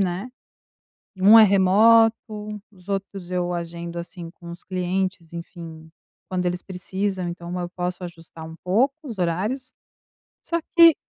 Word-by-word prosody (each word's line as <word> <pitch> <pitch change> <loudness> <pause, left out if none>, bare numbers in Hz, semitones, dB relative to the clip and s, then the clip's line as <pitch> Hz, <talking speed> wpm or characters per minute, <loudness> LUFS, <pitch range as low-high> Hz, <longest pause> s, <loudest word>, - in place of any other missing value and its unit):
né, 185 +4 -1 0.9
e 185 - -11
um 210 +4 +9
é 225 - +10
remoto, 215 +4 +6 0.6
os 185 -1 -18
outros 195 -2 -4
eu 180 -1 -1
agendo, 170 0 -5
assim, 170 -1 -8
com 170 0 -13
os 170 0 -9
clientes, 185 -2 -2
enfim, 165 -2 -9 0.4
quando 180 -1 -2
eles 180 0 -2
precisam, 190 0 -3
então 175 +1 -5
eu 175 -1 -3
posso 180 0 -4
ajustar 165 -2 -10
um 160 - -10
pouco 235 +10 +2
os 235 -9 -7
horários, 210 +10 -1 0.7
só 335 - -1 0.2
que 335 -2 +9
180 Hz, 145 wpm, -24 LUFS, 170-200 Hz, 0.9 s, é